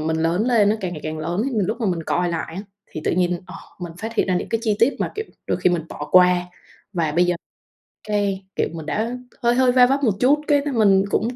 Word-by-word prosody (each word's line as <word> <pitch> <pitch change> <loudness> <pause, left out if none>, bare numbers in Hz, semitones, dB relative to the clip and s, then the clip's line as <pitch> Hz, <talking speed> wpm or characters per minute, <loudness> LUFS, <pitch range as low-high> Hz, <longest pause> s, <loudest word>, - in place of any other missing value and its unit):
mình 160 +1 -1
lớn 170 +7 +1
lên 220 -5 +4
á, 215 - +1
càng 185 -3 -3
ngày 155 - -7
càng 155 0 -4
lớn, 170 +6 -2
thì 275 - -1 0.2
lúc 220 +5 -3
mà 225 - 0
mình 175 -3 -1
coi 175 +2 0
lại 165 -1 -4
á, 195 - -4 0.3
thì 155 - -6
tự - - +1
nhiên, 180 0 0
ờ, - - -10 0.3
mình 175 -2 -6
phát 225 +3 -5
hiện - - +1
ra 185 - +2
những - - -3
cái 225 -1 -1
chi 215 -3 +1
tiết 245 +5 +3
mà - - -1
kiểu 435 - -3 0.2
đôi - - 0
khi 180 - +3
mình 175 -2 0
bỏ 150 0 -7
qua 180 -1 +5 0.5
và 165 -4 -1
bây 175 +3 +3
giờ, 175 -1 +1 0.7
cái 200 -2 -1
kiểu, - - +1
mình 160 -2 -7
đã 220 +11 -2 0.3
hơi 240 0 +3
hơi 255 0 +4
va 250 0 +6
vấp 275 +2 0
một 220 - +3
chút, 280 +4 +4
cái 290 -2 +4
mình 200 -4 +4
cũng 235 +4 0
190 Hz, 265 wpm, -22 LUFS, 170-230 Hz, 0.7 s, va